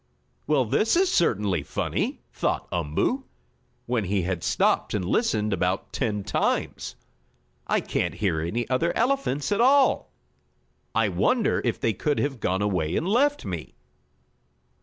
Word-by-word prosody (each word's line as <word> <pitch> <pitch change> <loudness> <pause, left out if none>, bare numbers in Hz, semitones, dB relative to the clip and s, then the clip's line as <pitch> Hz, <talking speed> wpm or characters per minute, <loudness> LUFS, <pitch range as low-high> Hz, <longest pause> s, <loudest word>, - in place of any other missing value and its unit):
"Well, 140 -4 +3
this 215 - +2
is 370 +1 +3
certainly 105 - +2
funny!" - - -2
thought - - -1
Umboo, 85 - -1 0.6
when 120 -4 0
he 95 0 0
had 90 -1 -2
stopped - - +1
and 95 -4 -1
listened 105 - +1
about 90 +1 -1
ten 105 -6 -1
times. - - -1 0.7
"I - - +2
can't - - -2
hear 85 -7 0
any 110 +9 -2
other 130 +7 0
elephants 235 - 0
at 205 +2 +2
all. 270 +2 +4 0.8
I - - +3
wonder 245 -4 +1
if 120 - -1
they 115 - +1
could 145 +9 -1
have 140 -4 -1
gone 95 0 0
away 90 -5 0
and 165 - 0
left 280 +8 +2
me?" - - -6
115 Hz, 140 wpm, -25 LUFS, -, 0.8 s, all